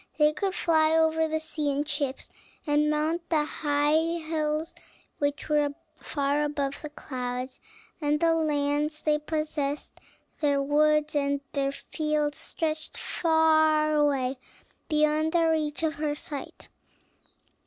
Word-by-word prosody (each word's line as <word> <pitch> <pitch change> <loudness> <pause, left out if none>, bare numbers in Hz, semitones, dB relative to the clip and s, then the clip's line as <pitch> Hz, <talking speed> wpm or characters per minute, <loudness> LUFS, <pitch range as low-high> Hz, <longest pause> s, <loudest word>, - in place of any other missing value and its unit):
They 300 0 +4
could 385 +2 -2
fly 315 -1 +3
over 320 0 +3
the 315 0 -1
sea 315 -2 -2
in 285 +1 -1
ships, 285 -2 -3 0.3
and 300 0 +2
mount 315 +3 -1
the 305 -3 +2
high 295 -1 0 0.2
hills 315 0 -2 0.5
which 285 +1 -1
were 295 -2 +1 0.2
far 285 0 0
above 285 -2 -2
the 300 - -6
clouds; 255 -3 -5 0.4
and 295 0 +1
the 330 0 +3
lands 300 -1 0
they 300 -1 +2
possessed, 300 -2 -2 0.5
their 285 -2 +2
woods 300 +2 +2
and 280 -1 +1
their 275 -1 0
fields, 300 +1 -2
stretched 315 -1 -3
far 315 -2 +3
away 275 -3 +1 0.5
beyond 305 +1 +2
the 335 -1 +3
reach 310 -1 0
of 315 -1 +1
her 295 0 -2
sight. 295 -1 -7
300 Hz, 130 wpm, -27 LUFS, 290-315 Hz, 0.5 s, They